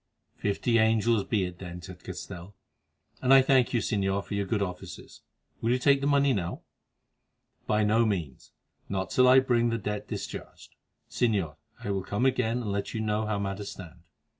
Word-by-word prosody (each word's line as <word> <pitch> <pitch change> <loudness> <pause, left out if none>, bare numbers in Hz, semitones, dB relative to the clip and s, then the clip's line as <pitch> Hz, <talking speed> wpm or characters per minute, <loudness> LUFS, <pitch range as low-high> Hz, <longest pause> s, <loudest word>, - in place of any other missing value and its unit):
"Fifty 115 +3 +1
angels 110 -1 +3
be 105 -4 0
it 90 0 -5
then," 90 -2 -7
said 90 +1 -11
Castell, 90 +3 -8 0.7
"and 130 - +2
I 135 -1 +8
thank 130 -2 +3
you, 120 - +1
Señor, 100 -1 0
for - - -7
your 100 -1 -1
good 105 0 0
offices. 90 -2 -8 0.4
Will 115 - 0
you 125 - +3
take 140 +1 +3
the 140 - 0
money 140 -1 +3
now?" 90 -5 -3 1.0
"By 105 0 +2
no 110 +3 +3
means; 85 - -3 0.4
not 95 -1 -2
till 125 0 +5
I 130 +1 +8
bring 120 -2 +2
the 115 - 0
debt 105 -1 -4
discharged. - - -7 0.3
Señor, 100 -11 0 0.3
I 100 - -2
will 95 -1 -1
come 100 +6 -1
again 125 -2 +1
and 105 - -3
let 100 +3 -3
you - - -1
know 110 0 -1
how 105 -1 0
matters 100 0 -4
stand. 90 -2 -11
105 Hz, 185 wpm, -28 LUFS, 95-120 Hz, 1.0 s, I